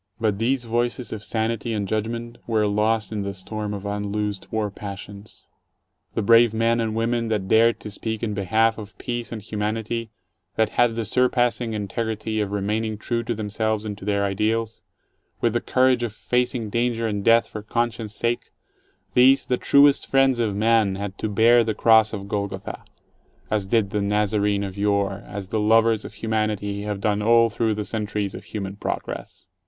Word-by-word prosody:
But 105 Hz, -3 st, 0 dB
these 125 Hz, +3 st, +1 dB
voices 120 Hz, +1 st, -1 dB
of 110 Hz, -1 st, -7 dB
sanity 115 Hz, +1 st, -2 dB
and 105 Hz, -2 st, -2 dB
judgment 115 Hz, +3 st, -3 dB
were 110 Hz, -2 st, +2 dB
lost 105 Hz, 0 st, +1 dB
in 105 Hz, -2 st, -2 dB
the 100 Hz, -1 st, -4 dB
storm 105 Hz, +2 st, -5 dB
of 100 Hz, -1 st, -5 dB
unloosed 105 Hz, 0 st, -3 dB
war 110 Hz, -2 st, -1 dB
passions. 100 Hz, +1 st, -9 dB, 0.7 s
The 110 Hz, -, 0 dB
brave 115 Hz, +1 st, +5 dB
men 115 Hz, +1 st, +2 dB
and 110 Hz, -1 st, -1 dB
women 115 Hz, +1 st, 0 dB
that 105 Hz, -4 st, -1 dB
dared 115 Hz, +3 st, +4 dB
to 105 Hz, -, -7 dB
speak 110 Hz, +2 st, -4 dB
in 110 Hz, -2 st, -1 dB
behalf 110 Hz, +4 st, +1 dB
of 105 Hz, -1 st, -10 dB
peace 120 Hz, -1 st, -4 dB
and 110 Hz, -3 st, -6 dB
humanity, 110 Hz, +2 st, -3 dB, 0.5 s
that 110 Hz, -1 st, +1 dB
had 120 Hz, -2 st, +2 dB
the 115 Hz, -1 st, -2 dB
surpassing 120 Hz, -1 st, +1 dB
integrity 110 Hz, +1 st, -3 dB
of 105 Hz, -, -1 dB
remaining 105 Hz, +2 st, -1 dB
true 115 Hz, +2 st, -2 dB
to 120 Hz, 0 st, -3 dB
themselves 110 Hz, 0 st, -2 dB
and 105 Hz, -1 st, -4 dB
to -, -, -11 dB
their 100 Hz, 0 st, 0 dB
ideals, 110 Hz, +3 st, -1 dB, 0.6 s
with 115 Hz, -2 st, +1 dB
the 120 Hz, -, 0 dB
courage 130 Hz, -1 st, +3 dB
of 120 Hz, -3 st, -2 dB
facing 125 Hz, -1 st, -1 dB
danger 115 Hz, 0 st, 0 dB
and 105 Hz, -2 st, -2 dB
death 115 Hz, +1 st, +5 dB
for 110 Hz, -, -7 dB
conscience 115 Hz, -1 st, -2 dB
sake 120 Hz, 0 st, -2 dB, 0.3 s
— 95 Hz, +1 st, -41 dB
these, 130 Hz, +2 st, +5 dB
the 125 Hz, -, +1 dB
truest 140 Hz, +2 st, +4 dB
friends 135 Hz, -2 st, +3 dB
of 110 Hz, -4 st, 0 dB
Man, 110 Hz, -2 st, +3 dB
had 100 Hz, 0 st, -5 dB
to 110 Hz, -, -2 dB
bear 115 Hz, +3 st, +5 dB
the 110 Hz, -2 st, -2 dB
cross 110 Hz, -1 st, +5 dB
of 100 Hz, -2 st, -6 dB
Golgotha, 100 Hz, -1 st, -4 dB, 0.7 s
as 105 Hz, -3 st, 0 dB
did 105 Hz, -2 st, +1 dB
the 105 Hz, -, 0 dB
Nazarene 105 Hz, 0 st, +1 dB
of 100 Hz, 0 st, -6 dB
yore, 100 Hz, -1 st, 0 dB
as 100 Hz, -2 st, -7 dB
the 110 Hz, -, 0 dB
lovers 110 Hz, +1 st, +3 dB
of -, -, -9 dB
humanity 105 Hz, -2 st, -1 dB
have 105 Hz, -1 st, -4 dB
done 105 Hz, -1 st, +1 dB
all 115 Hz, +1 st, +4 dB
through 110 Hz, +1 st, 0 dB
the 105 Hz, 0 st, -3 dB
centuries 105 Hz, -2 st, -3 dB
of -, -, -9 dB
human 100 Hz, -2 st, -5 dB
progress. -, -, -5 dB
110 Hz, 180 wpm, -23 LUFS, 105-115 Hz, 0.7 s, brave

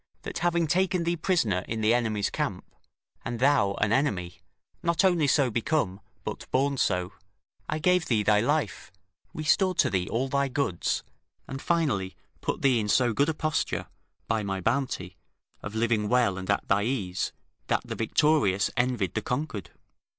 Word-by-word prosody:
] -, -, -43 dB
that -, -, -5 dB
having 170 Hz, 0 st, +2 dB
taken 180 Hz, +2 st, +1 dB
thee 170 Hz, +1 st, 0 dB
prisoner 120 Hz, -, +1 dB
in 110 Hz, 0 st, -3 dB
the 110 Hz, +2 st, +4 dB
enemy's 110 Hz, -4 st, 0 dB
camp, -, -, -3 dB, 0.6 s
and 115 Hz, 0 st, -4 dB
thou 125 Hz, -7 st, +3 dB
an 105 Hz, 0 st, +2 dB
enemy, 90 Hz, -11 st, -1 dB, 0.4 s
not 170 Hz, +2 st, +2 dB
only 175 Hz, -5 st, +3 dB
so 135 Hz, -3 st, +3 dB
become, 110 Hz, -, 0 dB, 0.2 s
but -, -, -6 dB
born 140 Hz, +2 st, +1 dB
so, 90 Hz, -6 st, 0 dB, 0.6 s
I -, -, 0 dB
gave 180 Hz, +2 st, +2 dB
thee 110 Hz, -4 st, +2 dB
thy 105 Hz, 0 st, +4 dB
life, 145 Hz, -5 st, -1 dB, 0.4 s
restored 180 Hz, +3 st, +1 dB
to 130 Hz, -, +3 dB
thee 95 Hz, -2 st, -1 dB
all 125 Hz, +4 st, 0 dB
thy 140 Hz, +1 st, +1 dB
goods, 130 Hz, -9 st, -1 dB, 0.4 s
and, 135 Hz, 0 st, -6 dB
finally, 130 Hz, -, 0 dB, 0.3 s
put -, -, -3 dB
thee 130 Hz, -4 st, +4 dB
in 105 Hz, -, -2 dB
so 120 Hz, 0 st, +3 dB
good 140 Hz, +8 st, +2 dB
a 160 Hz, -, -1 dB
posture, 155 Hz, -1 st, -1 dB, 0.4 s
by 110 Hz, -1 st, +1 dB
my 95 Hz, -2 st, -2 dB
bounty, 115 Hz, -4 st, -1 dB, 0.4 s
of 105 Hz, +1 st, -7 dB
living 110 Hz, -2 st, +1 dB
well 120 Hz, -6 st, +3 dB
and 95 Hz, +1 st, -7 dB
at 100 Hz, -, +1 dB
thy 100 Hz, +1 st, +3 dB
ease, 100 Hz, -6 st, -1 dB, 0.4 s
that -, -, +1 dB
the -, -, -5 dB
victorious 115 Hz, -5 st, +2 dB
envied 120 Hz, -7 st, 0 dB
the 110 Hz, -, -1 dB
conquered. 120 Hz, -, -3 dB
120 Hz, 170 wpm, -27 LUFS, 100-150 Hz, 0.6 s, the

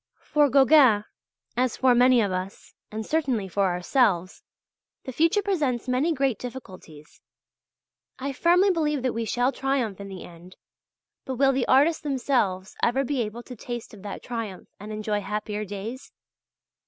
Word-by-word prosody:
For 295 Hz, -2 st, +3 dB
Gauguin 265 Hz, -6 st, +5 dB, 0.5 s
as 250 Hz, +1 st, 0 dB
for 260 Hz, -1 st, +4 dB
many 250 Hz, 0 st, +5 dB
of 200 Hz, -3 st, 0 dB
us, 185 Hz, +1 st, -6 dB, 0.2 s
and 220 Hz, +1 st, -5 dB
certainly 265 Hz, -10 st, 0 dB
for 195 Hz, +2 st, 0 dB
ourselves 185 Hz, 0 st, +1 dB, 0.6 s
the 260 Hz, -, -6 dB
future 330 Hz, -, +2 dB
presents 290 Hz, -, -1 dB
many 255 Hz, +6 st, +1 dB
great 270 Hz, -7 st, 0 dB
difficulties. 185 Hz, -, -10 dB, 1.0 s
I 275 Hz, +1 st, -4 dB
firmly 355 Hz, +7 st, +4 dB
believe 300 Hz, -6 st, 0 dB
that 255 Hz, -, 0 dB
we 230 Hz, 0 st, -2 dB
shall 245 Hz, +4 st, +1 dB
triumph 260 Hz, -8 st, -2 dB
in 200 Hz, -, -7 dB
the 190 Hz, -2 st, -8 dB
end; 175 Hz, +2 st, -14 dB, 0.7 s
but 260 Hz, -, -4 dB
will 270 Hz, +2 st, +4 dB
the 260 Hz, -1 st, 0 dB
artists 290 Hz, +5 st, +4 dB
themselves 240 Hz, -9 st, -1 dB
ever 260 Hz, +3 st, +2 dB
be 275 Hz, -1 st, -1 dB
able 230 Hz, +2 st, -5 dB
to 250 Hz, -, -10 dB
taste 240 Hz, 0 st, -7 dB
of 205 Hz, -, -12 dB
that 205 Hz, 0 st, -7 dB
triumph 225 Hz, -6 st, -6 dB
and 210 Hz, +2 st, -8 dB
enjoy 215 Hz, -1 st, -2 dB
happier 210 Hz, +1 st, -4 dB
days? 210 Hz, +6 st, -7 dB
245 Hz, 155 wpm, -25 LUFS, 205-270 Hz, 1.0 s, Gauguin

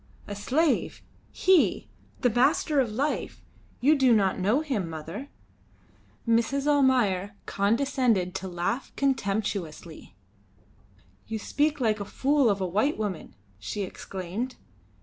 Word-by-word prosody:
"A 205 Hz, -, -6 dB
slave! 280 Hz, +10 st, 0 dB, 0.3 s
He! 370 Hz, -4 st, +3 dB, 0.3 s
The 245 Hz, -, +4 dB
master 285 Hz, +5 st, +2 dB
of 245 Hz, -5 st, +1 dB
life! 275 Hz, +7 st, -2 dB, 0.4 s
You 295 Hz, +5 st, +5 dB
do 260 Hz, -4 st, +4 dB
not 195 Hz, -3 st, +2 dB
know 210 Hz, +10 st, +2 dB
him, 240 Hz, -, -2 dB
mother." 165 Hz, -, -7 dB, 1.0 s
Mrs. 235 Hz, +5 st, +2 dB
Almayer 245 Hz, -9 st, +2 dB
condescended 225 Hz, -3 st, +1 dB
to 190 Hz, 0 st, -4 dB
laugh 180 Hz, +9 st, -2 dB
contemptuously. 195 Hz, -, -2 dB, 1.1 s
"You 225 Hz, -, -3 dB
speak 295 Hz, +7 st, 0 dB
like 220 Hz, -4 st, +1 dB
a 200 Hz, -, -4 dB
fool 275 Hz, +3 st, +2 dB
of 200 Hz, -1 st, +1 dB
a 190 Hz, -, -1 dB
white 210 Hz, -, +1 dB
woman," 205 Hz, -6 st, -4 dB, 0.2 s
she 105 Hz, -, -4 dB
exclaimed. 190 Hz, +6 st, -5 dB
225 Hz, 120 wpm, -27 LUFS, 195-275 Hz, 1.1 s, You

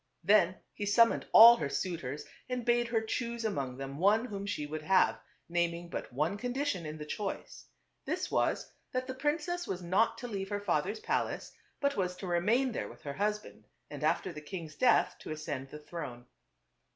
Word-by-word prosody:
Then 185 Hz, -3 st, +5 dB, 0.2 s
he 205 Hz, -, -4 dB
summoned 230 Hz, +3 st, +4 dB
all 235 Hz, +2 st, +11 dB
her 145 Hz, -, -2 dB
suitors 145 Hz, -2 st, -3 dB, 0.2 s
and 250 Hz, -2 st, -2 dB
bade 240 Hz, 0 st, +3 dB
her 230 Hz, -1 st, +1 dB
choose 235 Hz, +1 st, -3 dB
among 135 Hz, -12 st, -2 dB
them 135 Hz, +1 st, -6 dB
one 210 Hz, +6 st, +4 dB
whom 200 Hz, -4 st, -5 dB
she 150 Hz, -7 st, -2 dB
would 155 Hz, +1 st, -5 dB
have; 190 Hz, +4 st, +3 dB, 0.3 s
naming 170 Hz, 0 st, -1 dB
but -, -, -5 dB
one 155 Hz, +10 st, 0 dB
condition 245 Hz, -, -2 dB
in 155 Hz, +1 st, -6 dB
the 150 Hz, -, -7 dB
choice. 195 Hz, +6 st, -5 dB, 0.4 s
This -, -, -2 dB
was, -, -, 0 dB, 0.2 s
that 255 Hz, 0 st, -1 dB
the 260 Hz, -, -4 dB
princess 305 Hz, +6 st, -1 dB
was 180 Hz, -1 st, -4 dB
not 190 Hz, +6 st, +2 dB
to 245 Hz, -, -6 dB
leave 195 Hz, -4 st, -4 dB
her 205 Hz, -1 st, -1 dB
father's 200 Hz, +2 st, -1 dB
palace; -, -, -1 dB, 0.3 s
but 280 Hz, -1 st, 0 dB
was 180 Hz, -2 st, 0 dB
to 190 Hz, -, -8 dB
remain 210 Hz, +10 st, +2 dB
there -, -, -4 dB
with -, -, -14 dB
her 140 Hz, -, -4 dB
husband, 210 Hz, +4 st, -3 dB, 0.2 s
and -, -, -6 dB
after 185 Hz, -, +1 dB
the 150 Hz, -, -8 dB
king's 160 Hz, -1 st, -7 dB
death 245 Hz, -2 st, +4 dB
to -, -, -9 dB
ascend 150 Hz, -4 st, -4 dB
the 150 Hz, -, -8 dB
throne. 150 Hz, -6 st, -7 dB
195 Hz, 190 wpm, -32 LUFS, 155-230 Hz, 0.4 s, all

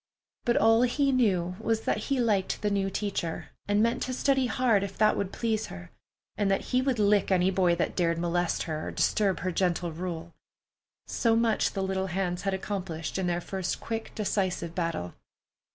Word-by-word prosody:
But 240 Hz, -, +3 dB
all 225 Hz, +2 st, +5 dB
he 275 Hz, +3 st, +2 dB
knew 185 Hz, -9 st, +2 dB
was 225 Hz, -1 st, 0 dB
that 215 Hz, -, -1 dB
he 275 Hz, -2 st, +1 dB
liked 210 Hz, -6 st, +1 dB
the 210 Hz, -, +1 dB
new 195 Hz, -1 st, +1 dB
teacher, 195 Hz, -5 st, -3 dB, 0.2 s
and 205 Hz, +1 st, +3 dB
meant 235 Hz, +1 st, +1 dB
to 255 Hz, -, -2 dB
study 265 Hz, 0 st, +2 dB
hard, 240 Hz, -5 st, +2 dB
if 195 Hz, -1 st, -5 dB
that 215 Hz, 0 st, +4 dB
would 195 Hz, -1 st, -2 dB
please 220 Hz, -2 st, -1 dB
her, 90 Hz, 0 st, -10 dB, 0.4 s
and 205 Hz, -2 st, +1 dB
that 195 Hz, -, +2 dB
he 255 Hz, -, +4 dB
would 260 Hz, -2 st, 0 dB
lick 205 Hz, -1 st, +3 dB
any 185 Hz, 0 st, +3 dB
boy 180 Hz, -2 st, +3 dB
that 170 Hz, -, -1 dB
dared 170 Hz, -2 st, +1 dB
molest 175 Hz, 0 st, 0 dB
her 155 Hz, -1 st, -4 dB
or -, -, -4 dB
disturb 200 Hz, -3 st, +1 dB
her 185 Hz, -, -1 dB
gentle 175 Hz, -1 st, 0 dB
rule. 170 Hz, 0 st, -5 dB, 0.7 s
So 230 Hz, -2 st, +1 dB
much 225 Hz, -1 st, +2 dB
the 195 Hz, -, -2 dB
little 190 Hz, 0 st, -1 dB
hands 180 Hz, -1 st, -2 dB
had 195 Hz, 0 st, -1 dB
accomplished 185 Hz, -4 st, -4 dB
in 185 Hz, -, 0 dB
their 175 Hz, 0 st, 0 dB
first 190 Hz, 0 st, -3 dB
quick, 225 Hz, -1 st, -4 dB
decisive 185 Hz, -5 st, -1 dB
battle. 165 Hz, -, -2 dB
195 Hz, 190 wpm, -28 LUFS, 175-220 Hz, 0.7 s, all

